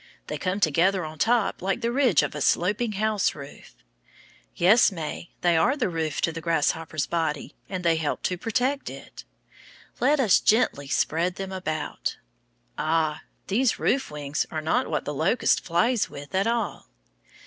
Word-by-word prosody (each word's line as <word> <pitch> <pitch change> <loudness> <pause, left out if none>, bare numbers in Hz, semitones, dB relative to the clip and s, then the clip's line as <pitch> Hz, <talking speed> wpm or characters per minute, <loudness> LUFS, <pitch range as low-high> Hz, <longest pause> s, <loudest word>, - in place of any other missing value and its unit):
They - - -5
come 185 +1 -1
together 180 +2 +2
on 155 0 -9
top 230 0 +1
like 195 +1 -1
the 235 - 0
ridge 250 - +3
of - - -3
a 150 - -5
sloping 210 - +1
house 215 0 0
roof. 140 -1 -12 0.8
Yes, 205 +7 +5
May, 165 -1 -6
they 175 -1 +3
are 250 - +3
the 245 -8 0
roof 160 -3 -2
to 165 - +1
the 165 0 -6
grasshopper's 160 -2 0
body, 160 0 -2 0.2
and 185 -2 -4
they 165 -1 +3
help 155 -2 -2
to 180 - 0
protect 255 +8 -1
it. - - -11 0.7
Let 285 +4 +3
us 220 -8 +5
gently 210 - +2
spread 170 +5 0
them 195 -1 -5
out. 155 -5 -3 0.6
Ah! 155 -1 0 0.2
these 230 +4 +1
roof 265 +1 0
wings 145 -1 -3
are 155 - -3
not 155 +1 0
what 150 - -2
the 150 - -3
locust 160 - +2
flies 210 +7 +1
with 145 0 -10
at 195 +3 +1
all. 230 - -2
180 Hz, 165 wpm, -25 LUFS, 155-220 Hz, 0.8 s, Yes